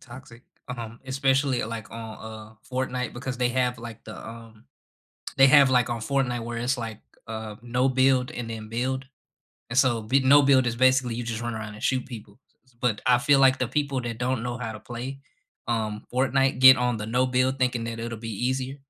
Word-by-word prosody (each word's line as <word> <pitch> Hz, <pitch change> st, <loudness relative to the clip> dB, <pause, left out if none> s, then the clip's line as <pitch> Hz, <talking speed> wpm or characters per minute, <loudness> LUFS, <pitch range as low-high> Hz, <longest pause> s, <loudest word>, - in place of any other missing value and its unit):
toxic, 120 Hz, -1 st, -13 dB, 0.3 s
um, 115 Hz, -2 st, -7 dB
especially, 135 Hz, -1 st, +1 dB
like, 110 Hz, -1 st, -7 dB
on, 115 Hz, -1 st, -7 dB
uh, 110 Hz, 0 st, -10 dB, 0.2 s
Fortnite 125 Hz, -1 st, -2 dB
because 130 Hz, +1 st, -5 dB
they 125 Hz, 0 st, +1 dB
have, 125 Hz, -1 st, 0 dB
like, 115 Hz, -2 st, -9 dB
the, 110 Hz, -, -9 dB
um 115 Hz, -1 st, -12 dB, 0.7 s
they 135 Hz, 0 st, +8 dB
have, 140 Hz, -1 st, +7 dB
like, 125 Hz, -1 st, +3 dB
on 120 Hz, -1 st, -2 dB
Fortnite 125 Hz, -1 st, -1 dB
where 120 Hz, 0 st, -5 dB
it's, 125 Hz, +3 st, 0 dB
like, 115 Hz, -3 st, -6 dB, 0.3 s
uh, 110 Hz, -1 st, -6 dB
no-build 130 Hz, +1 st, +2 dB
and 120 Hz, -1 st, -5 dB
then 110 Hz, -1 st, -7 dB
build. 130 Hz, +4 st, -2 dB, 0.7 s
And 125 Hz, -, 0 dB
so 120 Hz, -4 st, +3 dB
b 130 Hz, +6 st, +2 dB
no-build 135 Hz, -1 st, +5 dB
is 120 Hz, -, 0 dB
basically 130 Hz, -1 st, +3 dB
you 120 Hz, -, -3 dB
just 115 Hz, -1 st, -4 dB
run 120 Hz, -1 st, -3 dB
around 110 Hz, -1 st, -6 dB
and 105 Hz, -, -12 dB
shoot 130 Hz, -1 st, 0 dB
people, 110 Hz, -3 st, -11 dB, 0.2 s
s 130 Hz, -, -28 dB
s -, -, -33 dB
but, 120 Hz, -4 st, 0 dB
I 125 Hz, -1 st, +5 dB
feel 140 Hz, +2 st, +4 dB
like 130 Hz, -1 st, +5 dB
the 130 Hz, -, -1 dB
people 140 Hz, -2 st, -1 dB
that 120 Hz, -2 st, -5 dB
don't 125 Hz, -1 st, -1 dB
know 120 Hz, 0 st, -3 dB
how 115 Hz, -3 st, -4 dB
to 110 Hz, -, -9 dB
play, 125 Hz, +5 st, -7 dB, 0.5 s
um, 110 Hz, -2 st, -2 dB
Fortnite 135 Hz, +1 st, +1 dB
get 130 Hz, 0 st, +10 dB
on 125 Hz, -1 st, 0 dB
the 105 Hz, 0 st, -5 dB
no-build 130 Hz, +2 st, +1 dB
thinking 125 Hz, -2 st, 0 dB
that 115 Hz, 0 st, -5 dB
it'll 115 Hz, -1 st, -5 dB
be 115 Hz, +1 st, -3 dB
easier. 130 Hz, +1 st, -3 dB
125 Hz, 205 wpm, -25 LUFS, 115-130 Hz, 0.7 s, get